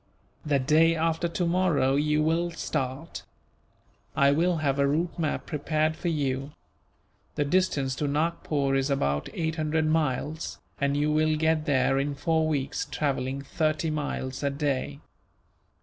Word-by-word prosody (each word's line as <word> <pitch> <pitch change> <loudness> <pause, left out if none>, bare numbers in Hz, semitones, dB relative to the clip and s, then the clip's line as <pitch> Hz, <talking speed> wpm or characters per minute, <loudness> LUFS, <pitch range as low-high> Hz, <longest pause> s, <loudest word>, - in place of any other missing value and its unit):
"The 145 -2 +2
day 155 +5 +4
after 165 +1 0
tomorrow 170 -5 +1
you 150 +1 +2
will 165 +2 +1
start. 140 -2 -4 0.9
I 140 0 +5
will 170 +4 +2
have 140 -3 0
a 140 - +4
route 165 +5 -1
map 155 -3 -1
prepared 155 +1 0
for 175 - -5
you. 140 -3 -1 0.8
The 145 - 0
distance 140 -5 +1
to 150 - -1
Nagpore 145 -2 0
is 135 +1 +1
about 70 - 0
eight 160 -1 -2
hundred 155 0 0
miles, 155 0 -1 0.2
and 140 0 +1
you 150 +1 +1
will 155 0 +2
get 160 0 +1
there 135 -1 +2
in 140 +1 -1
four 160 +2 +1
weeks, 145 -3 -1
travelling 135 -2 -2
thirty 155 +2 -1
miles 145 -3 -3
a 140 - +1
day. 140 0 -2
150 Hz, 145 wpm, -27 LUFS, 140-160 Hz, 0.9 s, I